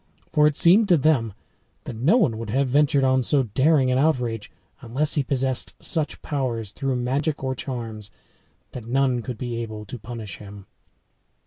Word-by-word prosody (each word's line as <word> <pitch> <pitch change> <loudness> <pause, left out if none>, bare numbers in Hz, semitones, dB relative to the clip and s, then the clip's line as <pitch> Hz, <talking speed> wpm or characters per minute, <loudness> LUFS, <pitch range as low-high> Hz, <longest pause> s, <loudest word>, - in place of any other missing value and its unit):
For 150 -1 +5
it 150 - 0
seemed 200 +6 +6
to 175 -3 +5
them 135 -8 +2 0.5
that - - -7
no 145 - +3
one 115 - +1
would 115 -2 -6
have 135 +5 +1
ventured 145 +1 +3
on 130 0 +3
so 135 +3 +2
daring 130 +4 +2
an 130 - +2
outrage 125 -8 0 0.3
unless 135 +6 0
he 150 - +2
possessed 130 -1 -2
such 160 -3 -3
powers, 120 -8 -2
through 135 +3 -2
magic 135 +5 -1
or 130 0 -1
charms, 115 -5 -5 0.6
that 120 -3 -8
none 130 -1 +1
could 125 0 -6
be 120 0 -4
able 110 -2 -7
to 120 +4 -8
punish 110 -2 -7
him. 100 -1 -11
130 Hz, 175 wpm, -24 LUFS, 115-145 Hz, 0.6 s, seemed